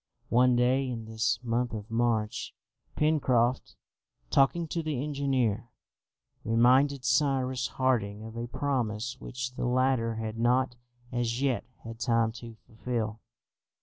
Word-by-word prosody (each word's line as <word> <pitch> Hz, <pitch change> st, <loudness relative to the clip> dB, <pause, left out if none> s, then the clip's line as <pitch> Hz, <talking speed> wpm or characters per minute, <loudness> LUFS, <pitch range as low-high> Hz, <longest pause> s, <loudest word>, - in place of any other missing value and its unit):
One 125 Hz, +1 st, +4 dB
day 130 Hz, +2 st, +2 dB
in 115 Hz, -3 st, -5 dB
this 110 Hz, 0 st, 0 dB
month 120 Hz, 0 st, -1 dB
of 110 Hz, 0 st, -6 dB
March, 115 Hz, -2 st, 0 dB, 0.4 s
Pencroft, 130 Hz, -5 st, +1 dB, 0.6 s
talking 165 Hz, +5 st, +3 dB
to 165 Hz, -, -1 dB
the 155 Hz, -5 st, -2 dB
engineer, 130 Hz, -6 st, 0 dB, 0.7 s
reminded 125 Hz, +4 st, +3 dB
Cyrus 130 Hz, -2 st, +1 dB
Harding 110 Hz, -6 st, 0 dB
of 110 Hz, 0 st, -9 dB
a 120 Hz, +1 st, -4 dB
promise 125 Hz, -2 st, -2 dB
which 125 Hz, 0 st, -5 dB
the 125 Hz, -, -2 dB
latter 125 Hz, -2 st, +1 dB
had 110 Hz, 0 st, -4 dB
not 125 Hz, +2 st, +2 dB, 0.4 s
as 120 Hz, +1 st, -1 dB
yet 135 Hz, -3 st, 0 dB, 0.2 s
had 115 Hz, 0 st, -8 dB
time 115 Hz, -2 st, +2 dB
to 115 Hz, -1 st, -9 dB
fulfil. 110 Hz, -1 st, -3 dB
125 Hz, 125 wpm, -29 LUFS, 115-130 Hz, 0.7 s, One